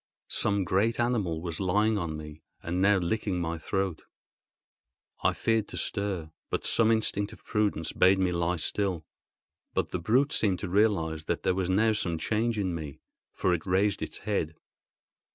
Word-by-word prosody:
Some 100 -1 +1
great 100 +6 +1
animal 105 -10 0
was 85 -2 -4
lying 105 +3 +2
on 80 -3 -3
me 75 0 -9 0.2
and 90 +2 -1
now 100 +1 +5
licking 95 +1 -1
my 85 -1 -2
throat. 95 0 -2 1.2
I - - +4
feared 115 -2 +1
to - - -7
stir, 95 -6 -2 0.2
for - - 0
some 115 -1 +3
instinct 105 -2 0
of - - -15
prudence 100 -7 0
bade 95 +1 +5
me 95 -1 +1
lie 85 0 0
still; 90 -1 -2 0.7
but - - 0
the 90 - -2
brute 125 - +2
seemed 100 -4 +2
to - - -4
realise 85 -6 +1
that - - -2
there - - +2
was 95 -1 -1
now 110 +4 +3
some 85 -5 -1
change 110 +6 0
in 95 -4 0
me, 75 -4 -6 0.3
for 90 - +1
it 80 -3 -1
raised 95 +2 +2
its - - -4
head. 95 -7 -2
95 Hz, 170 wpm, -28 LUFS, 85-105 Hz, 1.2 s, now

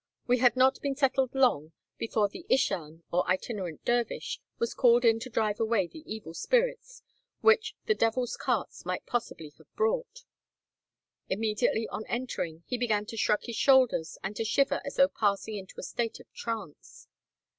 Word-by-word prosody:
We 250 0 +2
had 245 -1 +5
not 260 +1 +3
been 280 -1 -1
settled 265 -2 +1
long 165 - +2 0.3
before 220 -2 +1
the 205 - -10
ishan, 170 - 0
or 180 +1 +2
itinerant 185 -3 -2
dervish, 240 -1 -1 0.2
was 235 - -1
called 240 -1 +4
in 225 -1 +5
to 255 - -7
drive 215 -3 0
away 220 -4 +2
the 310 - -12
evil 215 -7 -6
spirits, - - 0 0.4
which 445 0 +4
the 440 - +3
"devil's 245 - 0
carts" - - -2
might - - -3
possibly 165 -10 -4
have - - -22
brought. - - -1 1.1
Immediately 220 +2 0
on 215 - -4
entering, 175 -10 -3
he 250 - -3
began 215 -4 +1
to 225 - -8
shrug 210 -1 +1
his 235 -2 -5
shoulders, 255 - +4
and 195 +2 -4
to - - 0
shiver 275 +5 +1
as 280 - -6
though 275 - +6
passing 210 -3 -1
into 195 -2 -8
a - - -6
state 230 -2 -3
of - - -14
trance. 230 - -7
230 Hz, 165 wpm, -29 LUFS, 205-265 Hz, 1.1 s, though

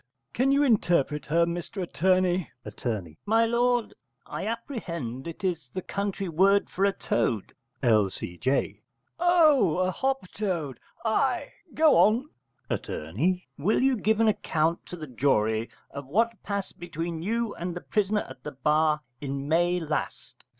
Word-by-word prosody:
Can 260 +3 +2
you 280 +1 +4
interpret 170 - +2
her, 165 +3 +3
Mr 175 +3 -5
Attorney? 185 0 +1 0.2
Att. 105 +4 -7 0.4
My 225 +2 +4
lord, 240 0 +1 0.3
I - - -5
apprehend 170 - -4
it 170 +5 -8
is 165 -8 -2
the 185 - -3
country 200 -1 -3
word 195 +5 +3
for 195 - +1
a 200 - +4
toad. 115 - -1 0.3
L.C.J. 110 +2 +1 0.4
Oh, 310 - +5
a 185 0 +1
hop 265 +3 -1
toad! 170 - -2 0.3
Ay, 250 +4 +1 0.2
go 315 -1 +5
on. 235 +8 +3 0.4
Att. - - -3 0.7
Will 205 - +2
you 265 -1 +4
give 220 -1 +1
an 225 - +4
account 165 -5 0
to - - -7
the 160 -3 -7
jury 115 -4 +1 0.2
of 140 -1 -7
what 225 +6 +1
passed 200 -1 -4
between 170 -1 -4
you 230 +4 -1
and 175 0 -5
the 175 - -5
prisoner 210 0 0
at 130 - -12
the 150 - -6
bar 150 +2 +2 0.2
in 140 0 -4
May 175 +3 +2
last? 155 -2 -4
180 Hz, 145 wpm, -27 LUFS, 150-220 Hz, 0.7 s, Oh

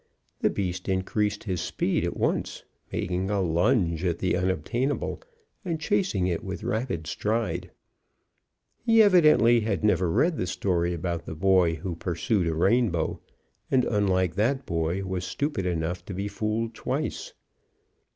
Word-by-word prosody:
The - - +2
beast 90 -1 -3
increased 105 +2 0
his 95 -5 -2
speed - - -1
at - - -2
once, - - -1 0.3
making 90 +2 -2
a 100 -1 +1
lunge 85 0 +1
at 85 -2 0
the 90 0 0
unobtainable, 120 - -1 0.4
and 170 -4 -2
chasing 180 - +1
it 90 +3 -1
with 95 +1 -5
rapid 115 -8 -2
stride. 95 -1 -2 1.1
He 225 -1 +6
evidently 155 - +6
had 105 -2 -1
never 95 -4 +3
read 160 - +2
the 90 - -1
story 85 -1 0
about 85 -1 -3
the 80 - -5
boy 90 -1 +3
who 85 +3 -4
pursued 90 +3 -1
a 80 - 0
rainbow, 95 -1 +1 0.5
and 130 -2 +3
unlike 95 -5 +1
that 130 +6 +1
boy, 85 +3 -1
was 95 -1 -3
stupid 110 -2 -2
enough 85 +1 -2
to 95 - -6
be 100 +2 -2
fooled 110 +2 -2
twice. - - -3
95 Hz, 145 wpm, -26 LUFS, 90-115 Hz, 1.1 s, He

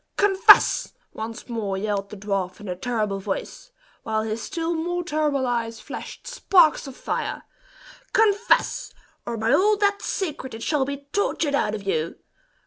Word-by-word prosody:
"Confess!" 410 +2 +6 0.2
once 220 0 -7
more 215 -5 -3
yelled 200 0 -2
the 210 - -9
dwarf 195 -2 -3
in 210 - -9
a 180 - -3
terrible 210 -1 -2
voice, - - -5 0.3
while 220 0 -1
his 220 +1 -3
still 335 - -2
more 350 +2 -2
terrible 300 -5 0
eyes 230 -2 -2
flashed - - -8
sparks 365 - +3
of 265 - -9
fire - - -3 0.7
"confess, 435 +1 +2 0.4
or 235 - -3
by 225 +3 +1
all 415 +7 +4
that's 405 0 +1
sacred 295 - -3
it 225 - -7
shall 295 -4 +1
be 280 +1 -6
tortured 330 -7 0
out 215 -6 +1
of 205 - -7
you. 165 -4 -1
260 Hz, 155 wpm, -24 LUFS, 215-355 Hz, 0.7 s, Confess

